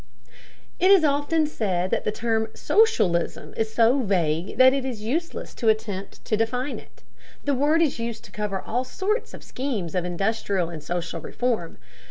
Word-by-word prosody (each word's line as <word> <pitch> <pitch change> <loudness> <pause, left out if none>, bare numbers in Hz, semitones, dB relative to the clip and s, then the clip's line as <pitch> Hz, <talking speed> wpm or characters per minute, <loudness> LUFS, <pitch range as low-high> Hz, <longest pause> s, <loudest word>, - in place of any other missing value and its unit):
It 370 - +4
is 390 -4 +7
often 295 +2 +2
said 190 -10 -1
that - - 0
the - - +1
term 220 0 0
"socialism" 385 - +2
is 220 0 -1
so 235 +4 +4
vague 180 - 0
that 260 +1 +7
it 275 -1 -1
is 245 -5 -5
useless 320 +10 -3
to 230 - +1
attempt 215 -3 -2
to 215 - +1
define 250 +5 -1
it. - - -19 0.4
The 285 - +1
word 295 +5 +3
is 285 -6 -1
used 230 -1 -4
to - - -14
cover 210 -2 -3
all 245 +6 -2
sorts 410 - -2
of - - -12
schemes 230 - -3
of 180 - 0
industrial 190 -1 -1
and 160 -2 -7
social 175 +2 -3
reform. 230 -9 -2
225 Hz, 175 wpm, -25 LUFS, 195-275 Hz, 0.4 s, is